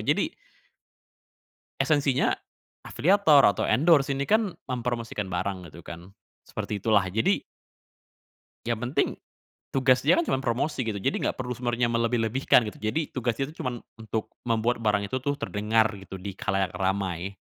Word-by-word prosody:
Jadi - - +1 1.5
esensinya, 140 -4 +2 0.5
afiliator 160 - +4
atau 100 - +2
endorse, 150 -2 +4
ini 140 0 -1
kan 215 -1 +2 0.2
mempromosikan 115 -5 -3
barang, 90 -2 -3
gitu 85 0 -14
kan. 85 +2 -9 0.3
Seperti 105 -2 -5
itulah. 105 -4 +3
Jadi 110 +5 +1 1.3
yang 120 -2 0
penting, 125 +4 0 0.6
tugas 130 -1 +3
dia - - +4
kan, 340 - +2
cuman 135 - 0
promosi, 130 +3 -1
gitu. 105 -2 -2
Jadi 135 +8 -1
nggak - - -1
perlu 125 -1 -3
sebenarnya 120 0 0
melebih-lebihkan, 115 +1 +2
gitu. 105 - -7
Jadi, 145 +8 -1
tugas 120 -3 -1
dia 135 - 0
tuh, 155 - -13
cuman 125 -1 -2 0.3
untuk, 110 0 -4 0.2
membuat 115 +1 +1
barang 100 -2 +1
itu 130 - -3
tuh 145 +1 -1
terdengar, 110 -2 +1
gitu, 95 -1 -9
di 95 0 -6
khalayak 95 -2 -1
ramai. 95 0 -2
115 Hz, 145 wpm, -26 LUFS, 100-135 Hz, 1.5 s, afiliator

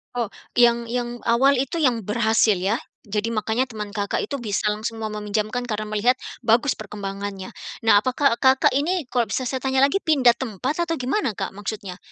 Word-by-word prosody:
Oh, 235 -4 -2 0.2
yang 235 -1 +4
yang 240 0 -3
awal 265 +4 +4
itu 270 +4 -2
yang 245 -4 +3
berhasil 220 -1 +3
ya? 195 +6 0 0.3
Jadi 210 +3 -1
makanya 220 +3 0
teman 215 -5 -6
Kakak 200 -1 -1
itu - - -4
bisa 210 -2 -1
langsung 220 +2 -2
mau 220 - -2
meminjamkan 215 +3 -2
karena 215 -1 -3
melihat 215 +4 +2 0.3
bagus 235 +4 +3
perkembangannya. 200 0 -6 0.4
Nah, - - +7
apakah 255 0 +2
Kakak 260 +2 +4
ini 310 +1 0
kalau 245 -2 +1
bisa 260 - -1
saya 260 0 -3
tanya 265 0 +1
lagi, 335 +8 +3
pindah 265 -7 +4
tempat 260 - -2
atau 330 -1 -1
gimana, 260 - 0
Kak, 195 -1 -5
maksudnya? 200 -2 -6
230 Hz, 180 wpm, -23 LUFS, 210-255 Hz, 0.4 s, Nah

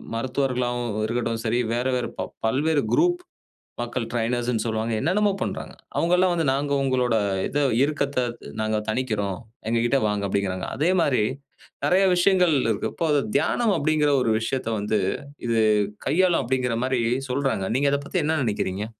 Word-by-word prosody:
மருத்துவர்களாகவும் 120 -2 -1
இருக்கட்டும் 115 0 -1
சரி, 115 +2 +1
வேற 120 +1 -1
வேற 125 - -1
ப - - -2 0.2
பல்வேறு 145 +6 +2
குரூப் 350 +2 +3 0.6
மக்கள் 120 0 -3
ட்ரெய்னர்ஸ்னு 120 -1 0
சொல்லுவாங்க, 110 0 -1
என்னன்னமோ 200 +7 +2
பண்றாங்க. - - -4 0.2
அவங்கல்லாம் 180 +2 +3
வந்து, 165 -3 0
"நாங்க 140 +1 -1
உங்களோட 125 -3 +1 0.3
இத 145 - -2 0.3
இருக்கத்த 140 -2 -1 0.4
நாங்க 110 0 0
தணிக்கிறோம். 110 -5 -1 0.3
எங்ககிட்ட 120 +4 +2
வாங்க." 105 -1 -1
அப்படீங்கிறாங்க. 95 -2 -1
அதே 155 +6 +2
மாரி 130 -8 +2 0.6
நெறைய 185 +7 +4
விஷயங்கள் 180 -2 +4
இருக்கு. 110 -3 -1
இப்போ 170 - -2
அது 145 - +3 0.2
"தியானம்" 230 -4 +2
அப்படீங்கிற 150 0 +2
ஒரு 115 - +2
விஷயத்த 125 +1 -2
வந்து, 105 +1 0 0.5
இது 115 -1 +2 0.5
கையாளும் 180 +1 +3
அப்படீங்கிற 125 -1 0
மாரி 130 -2 0 0.3
சொல்றாங்க. 125 -7 0
நீங்க 140 +2 +2
அதப் 140 0 -1
பத்தி - - -1
என்ன 160 +2 +1
நெனைக்கிறீங்க? 105 -2 -2
125 Hz, 145 wpm, -24 LUFS, 115-150 Hz, 0.6 s, நெறைய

